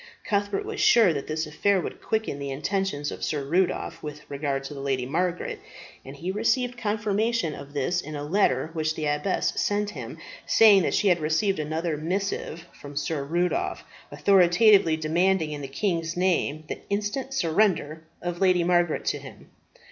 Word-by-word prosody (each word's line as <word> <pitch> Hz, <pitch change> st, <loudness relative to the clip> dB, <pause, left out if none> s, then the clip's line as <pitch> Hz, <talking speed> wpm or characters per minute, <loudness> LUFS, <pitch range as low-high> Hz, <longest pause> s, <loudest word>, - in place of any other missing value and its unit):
Cuthbert 205 Hz, -, -1 dB
was 425 Hz, 0 st, -5 dB
sure 220 Hz, -8 st, +6 dB
that 140 Hz, -2 st, -4 dB
this 155 Hz, +1 st, -2 dB
affair 195 Hz, +6 st, +1 dB
would -, -, -6 dB
quicken 220 Hz, -10 st, -2 dB
the 140 Hz, 0 st, -4 dB
intentions 150 Hz, +1 st, -2 dB
of -, -, -7 dB
Sir 145 Hz, -3 st, -1 dB
Rudolph 170 Hz, +1 st, 0 dB
with 150 Hz, 0 st, -8 dB
regard 140 Hz, -1 st, -2 dB
to 135 Hz, -, -7 dB
the 140 Hz, -, -8 dB
Lady 135 Hz, -2 st, -1 dB
Margaret, 175 Hz, +6 st, -2 dB, 0.4 s
and 135 Hz, +1 st, -10 dB
he 170 Hz, +6 st, -4 dB
received 245 Hz, +4 st, 0 dB
confirmation 215 Hz, -4 st, 0 dB
of 140 Hz, 0 st, -10 dB
this 160 Hz, +6 st, 0 dB
in 155 Hz, +1 st, -7 dB
a 145 Hz, -, -4 dB
letter 155 Hz, -4 st, +1 dB
which 155 Hz, -1 st, -1 dB
the 155 Hz, -, -3 dB
abbess 150 Hz, +6 st, 0 dB
sent 205 Hz, 0 st, 0 dB
him, -, -, -8 dB, 0.3 s
saying 210 Hz, -3 st, +7 dB
that -, -, 0 dB
she 205 Hz, -, +3 dB
had 175 Hz, -1 st, +3 dB
received 160 Hz, +5 st, +1 dB
another 155 Hz, +1 st, -2 dB
missive 170 Hz, 0 st, -3 dB
from 145 Hz, 0 st, -11 dB
Sir 145 Hz, 0 st, -2 dB
Rudolph, 175 Hz, +5 st, -1 dB, 0.3 s
authoritatively 190 Hz, -2 st, +4 dB
demanding 165 Hz, +1 st, +1 dB
in 145 Hz, -1 st, -5 dB
the 135 Hz, -, -5 dB
king's 165 Hz, +2 st, -2 dB
name 175 Hz, -4 st, +1 dB
the -, -, -5 dB
instant 210 Hz, +7 st, -2 dB
surrender 165 Hz, -, +1 dB, 0.2 s
of 175 Hz, 0 st, -4 dB
Lady 185 Hz, -2 st, +4 dB
Margaret 175 Hz, -1 st, +1 dB
to -, -, 0 dB
him. -, -, -13 dB
170 Hz, 170 wpm, -26 LUFS, 150-200 Hz, 0.4 s, saying